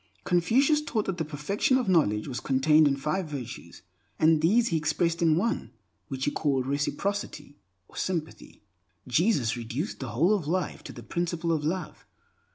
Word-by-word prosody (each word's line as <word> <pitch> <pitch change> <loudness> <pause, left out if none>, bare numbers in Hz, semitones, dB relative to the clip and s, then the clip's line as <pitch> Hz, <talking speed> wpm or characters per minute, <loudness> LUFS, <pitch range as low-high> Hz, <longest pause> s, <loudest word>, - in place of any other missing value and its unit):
Confucius 260 - +3
taught 225 -8 -2
that 190 -2 -3
the - - +1
perfection 160 - 0
of 250 -4 -1
knowledge 105 - +2
was 125 -3 -4
contained 150 +4 +4
in 140 - +2
five 155 +6 -2
virtues, 125 - -8 0.3
and 160 -1 +4
these 225 +9 +3
he 165 - +1
expressed 165 +2 0
in 160 -2 +4
one 230 +6 -1 0.4
which 135 -3 -3
he 145 - +1
called 135 -5 0
Reciprocity, 145 +1 -3 0.3
or - - -20
Sympathy. 165 - -4 0.4
Jesus 130 - +2
reduced 120 - -4
the 130 - -5
whole 170 - +2
of 185 -8 -1
life 180 +2 -2
to - - -7
the - - -10
principle 170 -1 -2
of 155 -2 0
Love. 175 +2 -4
160 Hz, 165 wpm, -27 LUFS, 140-185 Hz, 0.4 s, contained